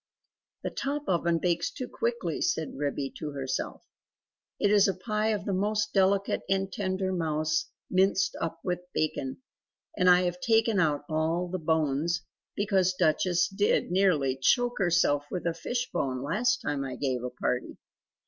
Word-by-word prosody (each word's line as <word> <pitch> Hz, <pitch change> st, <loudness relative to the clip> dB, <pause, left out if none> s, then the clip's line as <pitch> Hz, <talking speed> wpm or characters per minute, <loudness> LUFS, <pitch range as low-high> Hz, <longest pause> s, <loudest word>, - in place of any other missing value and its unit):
"The -, -, -2 dB
top 285 Hz, +1 st, -3 dB
oven 170 Hz, -2 st, +2 dB
bakes 170 Hz, 0 st, 0 dB
too 255 Hz, -, -6 dB
quickly," 475 Hz, 0 st, -2 dB
said 160 Hz, -, -1 dB
Ribby 140 Hz, -1 st, -2 dB
to 150 Hz, -2 st, -5 dB
herself. 135 Hz, -2 st, -3 dB, 0.8 s
"It 205 Hz, -, +3 dB
is 205 Hz, -1 st, +6 dB
a 195 Hz, -, 0 dB
pie 215 Hz, +3 st, -1 dB
of 210 Hz, -2 st, -1 dB
the 200 Hz, -, -1 dB
most 210 Hz, +3 st, 0 dB
delicate 195 Hz, 0 st, +2 dB
and 195 Hz, 0 st, 0 dB
tender 190 Hz, -1 st, -1 dB
mouse 155 Hz, -2 st, 0 dB, 0.2 s
minced 190 Hz, 0 st, +2 dB
up 165 Hz, 0 st, -3 dB
with 180 Hz, -1 st, -1 dB, 0.2 s
bacon. 155 Hz, -, -2 dB, 0.5 s
And 180 Hz, -, +4 dB
I 180 Hz, 0 st, +7 dB
have 180 Hz, 0 st, -1 dB
taken 225 Hz, -2 st, +3 dB
out 150 Hz, -4 st, +1 dB
all 160 Hz, +3 st, 0 dB
the 185 Hz, +1 st, -3 dB
bones; 160 Hz, +1 st, 0 dB, 0.3 s
because 190 Hz, -3 st, +2 dB
Duchess 175 Hz, +2 st, +2 dB
did 200 Hz, -2 st, +1 dB
nearly 170 Hz, -9 st, +3 dB
choke 245 Hz, -, +2 dB
herself 170 Hz, -6 st, +2 dB
with 180 Hz, -, -4 dB
a 170 Hz, -, +1 dB
fish 245 Hz, +9 st, -3 dB
bone 130 Hz, -1 st, -1 dB
last 225 Hz, -, +1 dB
time 145 Hz, -2 st, -1 dB
I 130 Hz, -2 st, -5 dB
gave 130 Hz, -2 st, -2 dB
a 125 Hz, -, -2 dB
party. 125 Hz, 0 st, -3 dB
180 Hz, 160 wpm, -28 LUFS, 155-200 Hz, 0.8 s, I